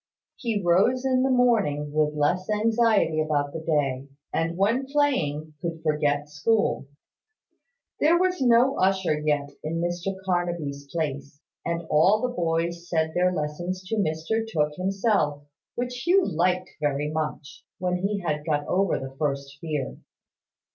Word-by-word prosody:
He 230 -4 -2
rose 200 +9 +3
in 255 -1 +3
the 265 - +2
morning 210 - +2
with 150 -1 +1
less 175 +7 0
anxiety 215 -6 +2
about 145 -2 0
the 165 - -4
day: 140 -4 0 0.3
and 165 +1 -1
when 230 +8 +1
playing, 165 - 0
could 165 -1 -4
forget 150 -2 +1
school. 150 +1 0 1.1
There 325 +3 +5
was 365 -3 +1
no 245 +2 +4
usher 190 -5 +2
yet 145 -2 0
in 165 +2 -2
Mr 175 +3 -2
Carnaby's 170 -6 -2
place; 145 -3 -3 0.2
and 170 0 -2
all 180 +8 +5
the 250 +2 -2
boys 170 -1 -1
said 160 -1 0
their 180 +1 +2
lessons 175 +3 -3
to 225 - 0
Mr 165 +4 0
Tooke 150 -3 +1
himself: 190 -6 0 0.3
which 245 0 -3
Hugh 380 +2 +5
liked 180 +2 0
very 145 0 -1
much, 155 -1 -4
when 180 0 0
he 200 +2 -1
had 150 -4 -2
got 150 -2 0
over 190 +2 +1
the 135 0 -7
first 140 -2 -2
fear. 150 -5 -3
170 Hz, 145 wpm, -25 LUFS, 150-205 Hz, 1.1 s, There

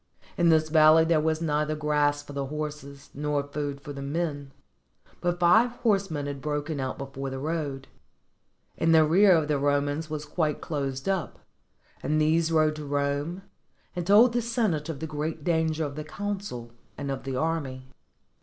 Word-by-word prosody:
In 170 -1 +3
this 155 -1 +3
valley 155 +1 +6
there 165 -1 +3
was 160 +1 0
neither 150 0 0
grass 150 -1 +1
for 145 - -11
the 140 -1 -3
horses, 150 -1 -6
nor 145 0 -1
food 145 0 -4
for 145 - -7
the 140 - -7
men; 145 -1 -3 0.7
but 175 0 -1
five 220 +8 +5
horsemen 195 - 0
had 140 -1 -5
broken 150 0 -3
out 130 -1 -3
before 135 0 -5
the 135 - -5
road 145 -2 -3 0.9
in 165 0 +2
the 160 -1 +6
rear 185 +5 +6
of 160 -3 +2
the 150 -2 +1
Romans 145 +2 0
was 150 -1 -4
quite 150 -1 -1
closed 135 -2 -4
up, 190 -4 -1 0.6
and 155 +3 0
these 160 +2 +2
rode 155 -1 +2
to 150 - -6
Rome, 145 +5 -2 0.5
and 175 -1 -3
told 225 +4 +6
the 240 - +1
senate 220 - -1
of 155 -3 -5
the - - -2
great 155 0 -4
danger 160 -1 +1
of 140 -1 -6
the 155 - -5
consul 195 - -5 0.3
and 140 -1 -3
of 135 - -4
the 135 -1 -4
army. 140 -4 -2
150 Hz, 175 wpm, -27 LUFS, 145-165 Hz, 0.9 s, valley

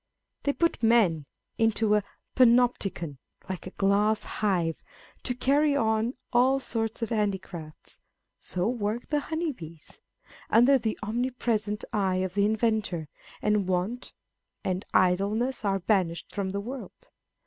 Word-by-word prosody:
They 285 - 0
put 335 -4 0
men 205 -11 +3 0.3
into 225 -1 +2
a 210 - +4 0.3
Panopticon, 235 - +3 0.3
like 185 -2 -5
a 185 - -11
glass 205 +2 +2
hive, 175 -6 -1 0.4
to 250 - -3
carry 285 +3 +3
on 220 -1 +1 0.2
all 260 +3 +4
sorts 225 -3 -2
of 230 - -2
handicrafts 190 -7 -4 0.2
(" - - -54
So 180 +2 -2
work 230 -1 -2
the 295 - +2
honey 320 +2 -2
bees" 165 - -12 0.2
â€" - - -23
) - - -21
under 260 +3 +6
the 220 -2 -2
omnipresent 225 -2 -1
eye 195 -3 +1
of 185 0 -1
the 200 0 +2
inventor, 215 -7 0 0.3
and 210 -2 +2
want 190 +7 -2 0.5
and 185 +1 -1
idleness 205 +8 +2
are 195 -1 +1
banished 180 -3 0
from 200 -2 -2
the 200 +1 -2
world. 250 +4 -9
215 Hz, 140 wpm, -27 LUFS, 190-240 Hz, 0.5 s, under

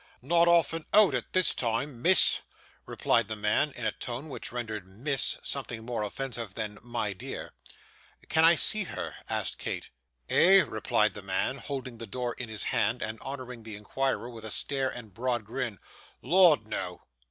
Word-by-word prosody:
'Not 170 +5 +4
often 165 -1 +3
out 210 -2 +7
at - - -2
this 185 -1 +3
time, 120 +2 -2
miss,' 185 +5 +6 0.5
replied - - +1
the 110 - -3
man 105 +8 +1
in 125 - -6
a 110 - +2
tone 125 +8 -6
which 135 - -4
rendered 110 -5 -5
"Miss," 130 +9 0
something 115 -4 -4
more 120 -2 -2
offensive 115 -2 -4
than 105 -2 -4
"My 120 -3 -3
dear." 95 - -7 0.7
'Can 160 - +3
I 165 +1 +8
see 215 +5 +3
her?' - - -5 0.2
asked - - -2
Kate. - - -4 0.4
'Eh?' 190 +1 +6
replied 110 -4 +1
the 105 - -7
man, 100 +8 -1
holding 130 -4 -6
the 115 - -6
door 120 +3 -3
in 120 -3 -6
his 110 -2 -1
hand, 115 +5 +1
and 110 0 -5
honouring 130 -3 -7
the 110 -1 -7
inquirer 120 +4 -2
with 115 -3 -10
a 110 - -4
stare 135 +4 -1
and 120 -4 -8
a - - -27
broad 120 +2 -2
grin, 120 -2 -3 0.5
'Lord, 175 - +5
no. 110 - -4
120 Hz, 175 wpm, -29 LUFS, 110-140 Hz, 0.7 s, I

